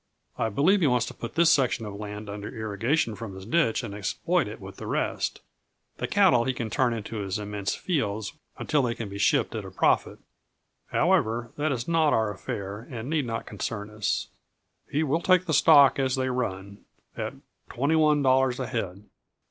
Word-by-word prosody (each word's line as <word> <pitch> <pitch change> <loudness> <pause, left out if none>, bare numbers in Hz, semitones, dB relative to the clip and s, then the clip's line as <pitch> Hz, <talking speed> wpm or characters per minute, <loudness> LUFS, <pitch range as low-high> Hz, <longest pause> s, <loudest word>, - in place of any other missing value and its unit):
I 115 - 0
believe 170 - +3
he 155 - +4
wants 125 -2 +2
to - - -7
put 115 - -7
this 170 -1 +5
section 125 -4 +2
of 105 - -6
land 105 +1 -7
under 100 +1 -6
irrigation 110 +3 -1
from 105 -3 -7
his 95 0 -9
ditch 125 -2 +1
and 105 -4 -6
exploit 100 -2 0
it - - -8
with - - -10
the - - -7
rest; - - -1 0.6
the - - -2
cattle 120 -1 +4
he 130 - 0
can 115 -3 -4
turn 130 -2 +2
into 115 0 -5
his 100 -1 -2
immense 105 -1 -3
fields 110 - -2 0.2
until 150 -2 +1
they 120 -3 -1
can 115 -3 -5
be 100 0 -7
shipped - - +2
at - - -4
a - - -8
profit. - - +1 0.7
However, 115 +1 +1
that 150 +1 0
is 120 -3 -3
not 165 -3 +3
our 110 -2 +2
affair 100 +3 -6
and 125 +2 -6
need 150 -5 0
not 115 -1 -3
concern 105 -2 -5
us. 105 -2 -1 0.6
"He 150 +3 0
will 155 +3 0
take 185 0 +4
the 160 - -1
stock 145 -3 +6
as 130 -1 +1
they 130 0 -1
run, 100 -5 -4 0.4
at - - -4 0.3
twenty 140 +6 +1
one 150 -2 +4
dollars 130 -1 +3
a 130 - -1
head. 100 -3 -4
115 Hz, 195 wpm, -26 LUFS, 105-140 Hz, 0.7 s, stock